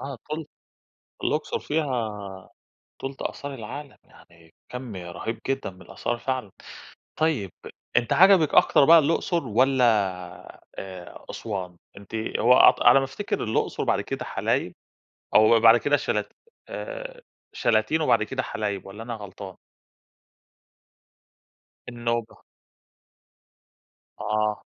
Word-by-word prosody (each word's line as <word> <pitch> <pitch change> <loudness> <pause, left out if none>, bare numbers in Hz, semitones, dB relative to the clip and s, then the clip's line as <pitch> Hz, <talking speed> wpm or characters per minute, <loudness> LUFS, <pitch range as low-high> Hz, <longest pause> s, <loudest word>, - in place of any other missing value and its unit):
آه 135 -3 -6
تُلت 155 0 -4 0.8
الأقصر - - -1
فيها 115 -10 -2 0.7
تُلت 135 0 -6
آثار 140 0 -5
العالم. 135 +4 -8
يعني 85 -1 -21 0.2
كَم 125 -4 -6
رهيب 90 +6 -5
جدًا 135 -4 -1
من 90 -1 -16
الآثار 120 +1 -4
فعلًا. 130 -4 -3 0.7
طيب 145 - 0 0.5
أنتِ 120 -1 +2
عجبك 185 -4 +6
أكتر 140 - +6
بقى 165 +2 +8
الأقصر 165 +1 0
والّا، 125 +3 +3 0.9
آآ، 95 -2 -9
أسوان؟ 95 -5 -5 0.2
أنتِ 100 +2 -13 0.2
هو 120 +3 +5
أعتق 125 0 +6
على - - +8
ما 135 - 0
أفتكر 135 +10 -3
الأقصر 110 -1 -1
وبعد - - +1
كده - - -5
حلايب؟ - - -1 0.6
أو 110 +1 +6
بعد 115 +1 +8
كده 145 +4 +2
شلا - - -1 0.4
آآ، - - -7 0.3
شلاتين 110 +8 +1
وبعد 155 - +3
كده 130 +4 -2
حلايب 100 -5 -4
والّا 105 +3 -9
أنا 120 0 -5
غلطان؟ 100 -2 -9 2.3
النوبة. 120 -1 -3 1.8
آه. 105 0 -1
120 Hz, 115 wpm, -25 LUFS, 105-140 Hz, 2.3 s, بقى